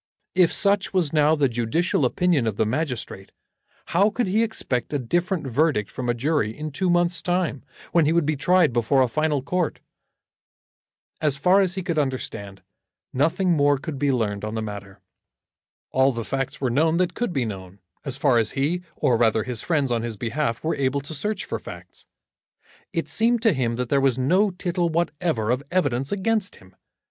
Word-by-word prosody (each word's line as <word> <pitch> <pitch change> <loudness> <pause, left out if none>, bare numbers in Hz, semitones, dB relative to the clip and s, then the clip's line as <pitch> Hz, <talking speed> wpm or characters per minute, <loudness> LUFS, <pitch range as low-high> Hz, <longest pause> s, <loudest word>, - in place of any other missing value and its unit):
If 180 -2 +4
such 200 0 +1
was 165 -6 +1
now 155 0 +4
the 145 -3 +2
judicial 125 +7 0
opinion 155 -2 +1
of 105 -2 -2
the - - +2
magistrate, 125 -6 -3 0.5
how 195 +5 +3
could 240 +3 -1
he 200 +4 +1
expect 140 - -2
a - - +3
different 175 - -1
verdict 135 -4 +1
from 125 -1 -4
a 120 - +1
jury 120 -4 0
in 155 0 -5
two 185 +6 -1
months' 175 0 +2
time, 175 -6 -1 0.3
when 170 -3 +4
he - - +3
would 170 -2 +2
be 155 +1 0
tried 160 +1 +3
before 125 +3 +3
a - - +1
final 150 +1 0
court? 175 +2 -1 1.4
As 150 -3 +1
far 180 +7 +4
as 185 -1 0
he 190 - -3
could 170 -4 -1
understand, 115 -8 -4 0.5
nothing 170 +7 +1
more 145 -3 +3
could 140 0 -6
be 145 0 +2
learned 105 -5 -1
on 110 +1 -4
the 110 - -2
matter. 100 -2 -8 0.9
All 130 +1 +3
the 115 -3 -5
facts 135 -1 -3
were 130 -3 0
known 160 +6 +2
that 180 -1 +1
could 240 -4 -2
be 135 -7 0
known, 95 -3 -7 0.3
as 135 -2 -4
far 135 -4 +3
as 110 -2 0
he, 150 +6 0
or 120 - +2
rather 110 -2 +2
his 120 -2 -3
friends 145 -6 0
on 115 -1 +1
his 115 -2 -5
behalf, 115 +2 -2
were 160 - 0
able 140 +1 0
to 145 +4 -9
search 210 +7 -3
for - - -4
facts. - - -11 0.8
It - - -2
seemed 230 +1 +1
to 225 - +4
him 120 -4 -1
that 125 0 -3
there 140 -1 +3
was 135 -2 +2
no 180 +11 +3
tittle 175 -1 -1
whatever 160 -8 -1
of 125 +2 0
evidence 140 -7 0
against 205 0 -1
him. 95 0 -19
145 Hz, 195 wpm, -24 LUFS, 120-175 Hz, 1.4 s, If